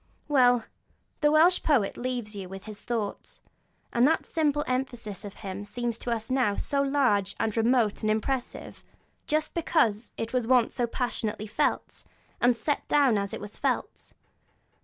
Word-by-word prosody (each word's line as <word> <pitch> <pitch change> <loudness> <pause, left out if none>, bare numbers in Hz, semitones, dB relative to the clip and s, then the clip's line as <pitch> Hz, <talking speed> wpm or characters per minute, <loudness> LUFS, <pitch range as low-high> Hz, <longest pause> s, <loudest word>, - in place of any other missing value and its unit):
Well, 245 -5 +4 0.5
the 295 -1 +3
Welsh 330 +4 +5
poet 255 -10 +2
leaves 245 -4 -4
you 190 -2 -6
with 195 0 -8
his 215 -2 -9
thought, 225 -4 -4 0.6
and 240 +3 +5
that 320 - +1
simple 295 -2 0
emphasis 245 -5 -3
of 205 -1 -8
his 200 0 -7
seems 235 +1 -3
to - - -5
us 230 +1 -2
now 255 -6 +2
so 280 -1 0
large 255 -9 +2
and 220 -1 0
remote 230 -2 +2
and 215 - 0
impressive, 240 +4 -3 0.4
just 305 0 0
because 240 -10 +1
it 225 +2 -4
was 250 -3 0
once 250 -2 +3
so 240 - 0
passionately 225 -3 -3
felt, 210 - -1 0.4
and 245 -1 +4
set 290 +6 -2
down 280 -6 +4
as 200 -1 -1
it - - -5
was 205 0 -8
felt. - - -2
240 Hz, 160 wpm, -27 LUFS, 210-270 Hz, 0.6 s, Welsh